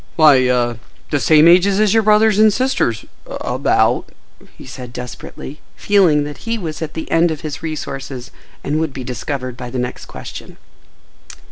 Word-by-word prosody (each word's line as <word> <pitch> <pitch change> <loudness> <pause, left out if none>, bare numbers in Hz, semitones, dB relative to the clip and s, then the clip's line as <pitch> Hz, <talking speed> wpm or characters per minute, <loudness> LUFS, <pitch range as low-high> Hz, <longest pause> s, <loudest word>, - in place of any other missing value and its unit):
"Why,—ah—the 125 -3 +2
same 155 +3 +5
ages 190 +3 +5
as 215 -2 +3
your 225 - +4
brothers 215 0 +4
and 215 0 +6
sisters—about," 200 - -1 0.5
he - - -12
said 125 -1 -9
desperately, 125 +4 -8
feeling 180 -8 +3
that 145 0 -7
he 230 0 -3
was 160 -6 -6
at 155 -2 -5
the 160 - -6
end 165 +1 +3
of 155 -2 -4
his 150 -2 -6
resources 135 -5 -6 0.3
and 150 +2 -1
would 160 -3 -2
be 130 - -6
discovered 130 0 -5
by 125 0 -7
the 130 - -5
next 125 0 -4
question. - - -10
150 Hz, 150 wpm, -18 LUFS, 125-185 Hz, 0.5 s, and